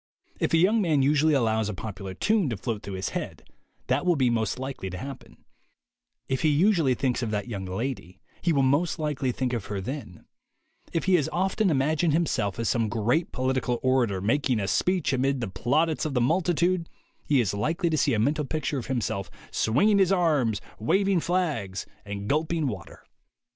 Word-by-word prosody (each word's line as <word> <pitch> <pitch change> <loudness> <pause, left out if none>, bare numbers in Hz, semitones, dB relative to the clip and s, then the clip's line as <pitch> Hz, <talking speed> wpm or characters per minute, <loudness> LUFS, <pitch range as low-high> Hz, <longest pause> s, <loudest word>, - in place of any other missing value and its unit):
If - - 0
a - - +5
young 205 +7 +4
man 155 -7 +2
usually 150 +2 +3
allows 110 -4 +1
a 105 - -4
popular 95 -2 -6
tune 210 - +1
to 115 - -3
float 105 +2 -3
through 100 - -6
his 95 - -2
head, - - -5 0.4
that - - +1
will 180 -1 +3
be 130 -4 +2
most 110 -2 0
likely 130 -7 -5
to 90 - -6
happen; 135 +5 -9 0.8
if 130 -1 -1
he 155 - +3
usually 160 -3 +3
thinks 125 0 0
of 115 - -2
that 105 +1 -2
young 100 -5 -5
lady, 95 -2 -4 0.2
he 170 - +2
will 140 -3 +3
most 145 +7 +2
likely 150 -5 -1
think 125 0 -2
of 115 -4 -2
her 100 -1 -4
then; 115 -3 -7 0.7
if 165 - -1
he 190 - +2
has 155 -1 0
often 190 +3 +1
imagined 155 +2 +2
himself 125 - 0
as 115 -1 -1
some 115 +2 +1
great 120 +9 0
political 130 -2 -1
orator 125 -7 +2
making 125 +3 +1
a 100 - -2
speech 180 - +1
amid 135 +1 +1
the 115 - -2
plaudits 145 - 0
of 150 -3 -2
the - - +3
multitude, 170 +5 +1 0.4
he 145 -3 +3
is 105 -5 +1
likely 160 - 0
to 155 - +1
see - - +2
a - - 0
mental 150 +7 +1
picture 150 -1 -2
of 120 - -7
himself 110 -6 -2 0.2
swinging 200 - +3
his 190 -1 +4
arms, 150 - +2 0.2
waving 195 - +2
flags 150 - -1 0.2
and 100 0 -5
gulping 155 +3 0
water. 105 -10 -6
130 Hz, 190 wpm, -26 LUFS, 110-160 Hz, 0.8 s, a